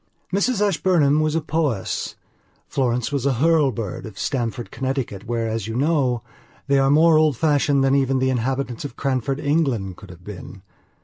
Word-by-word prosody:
Mrs 210 Hz, +1 st, +2 dB
Ashburnham 160 Hz, -6 st, +2 dB
was 155 Hz, 0 st, +1 dB
a 165 Hz, -, +1 dB
Powys; 150 Hz, -9 st, -2 dB, 0.5 s
Florence 125 Hz, -1 st, -1 dB
was 140 Hz, -1 st, 0 dB
a 140 Hz, -, +2 dB
Hurlbird 135 Hz, -, +1 dB
of 105 Hz, -4 st, -10 dB
Stamford, 120 Hz, -1 st, -3 dB
Connecticut, 130 Hz, -6 st, -3 dB
where, 115 Hz, -1 st, -1 dB
as 110 Hz, -2 st, -3 dB
you 110 Hz, -, -4 dB
know, 130 Hz, -4 st, +1 dB, 0.4 s
they 140 Hz, 0 st, +3 dB
are 135 Hz, 0 st, +3 dB
more 155 Hz, +2 st, +5 dB
old 155 Hz, -5 st, +2 dB
fashioned 145 Hz, -2 st, +2 dB
than 135 Hz, 0 st, +3 dB
even 135 Hz, -1 st, +2 dB
the 130 Hz, 0 st, +1 dB
inhabitants 130 Hz, 0 st, -2 dB
of 145 Hz, -, -7 dB
Cranford, 135 Hz, 0 st, -1 dB
England, 135 Hz, -, 0 dB
could 100 Hz, -, -13 dB
have 90 Hz, 0 st, -13 dB
been. 95 Hz, -1 st, -10 dB
135 Hz, 170 wpm, -22 LUFS, 115-150 Hz, 0.5 s, more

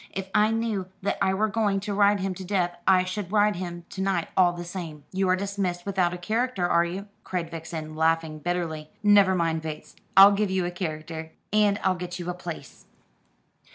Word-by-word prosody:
If 190 Hz, 0 st, -5 dB
I 210 Hz, +1 st, +4 dB
knew 225 Hz, -4 st, -1 dB, 0.2 s
that 200 Hz, -, -1 dB
I 190 Hz, -1 st, +2 dB
were 215 Hz, +3 st, +2 dB
going 205 Hz, -2 st, +1 dB
to 205 Hz, 0 st, -3 dB
ride 200 Hz, 0 st, +3 dB
him 190 Hz, 0 st, -1 dB
to 190 Hz, -, -8 dB
death 180 Hz, -2 st, 0 dB
I 185 Hz, -1 st, +6 dB
should 185 Hz, 0 st, -5 dB
ride 210 Hz, -2 st, +3 dB
him 175 Hz, -1 st, -6 dB
to 190 Hz, -, -5 dB
night 190 Hz, -3 st, 0 dB
all 180 Hz, -2 st, +5 dB
the 175 Hz, 0 st, -7 dB
same. 165 Hz, -5 st, -7 dB
You 190 Hz, 0 st, 0 dB
are 185 Hz, -, +5 dB
dismissed 190 Hz, -2 st, -3 dB
without 190 Hz, -3 st, +1 dB
a 180 Hz, -, -5 dB
character, 220 Hz, 0 st, -1 dB
are 170 Hz, -1 st, +4 dB
you?" 185 Hz, +4 st, -4 dB, 0.2 s
cried 170 Hz, -3 st, -3 dB
Vixen, 160 Hz, -1 st, -6 dB
laughing 160 Hz, -1 st, +1 dB
bitterly. 160 Hz, -2 st, -3 dB
"Never 200 Hz, -2 st, +6 dB
mind, 165 Hz, -2 st, 0 dB
Bates, 155 Hz, -1 st, -7 dB, 0.2 s
I'll 195 Hz, +1 st, +10 dB
give 205 Hz, 0 st, +1 dB
you 190 Hz, -1 st, 0 dB
a 175 Hz, -, -2 dB
character; 160 Hz, -2 st, -5 dB, 0.2 s
and 210 Hz, -1 st, +3 dB
I'll 190 Hz, -, +3 dB
get 180 Hz, -1 st, -6 dB
you 180 Hz, 0 st, -4 dB
a -, -, -4 dB
place." 170 Hz, -6 st, -9 dB
185 Hz, 205 wpm, -26 LUFS, 170-200 Hz, 0.2 s, I'll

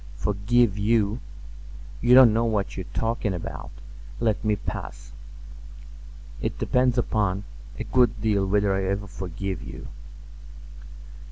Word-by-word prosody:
"Forgive 105 Hz, -, +1 dB
you! 105 Hz, +1 st, +2 dB, 0.8 s
You 120 Hz, +1 st, +6 dB
don't 130 Hz, -4 st, +8 dB
know 115 Hz, +1 st, +2 dB
what 105 Hz, -3 st, -1 dB
you 95 Hz, -, -4 dB
are 95 Hz, -, -10 dB
talking 115 Hz, -3 st, -1 dB
about. 85 Hz, -, -6 dB, 0.5 s
Let 110 Hz, -3 st, 0 dB
me 105 Hz, -1 st, +2 dB
pass. -, -, -7 dB, 1.3 s
It -, -, -2 dB
depends 125 Hz, 0 st, +2 dB
upon—a 100 Hz, -, -2 dB
good 125 Hz, -4 st, +2 dB
deal 105 Hz, -3 st, +1 dB
whether 100 Hz, 0 st, +2 dB
I 95 Hz, 0 st, 0 dB
ever 100 Hz, +2 st, -2 dB
forgive 95 Hz, 0 st, -5 dB
you." -, -, -9 dB
105 Hz, 120 wpm, -25 LUFS, 95-115 Hz, 1.3 s, don't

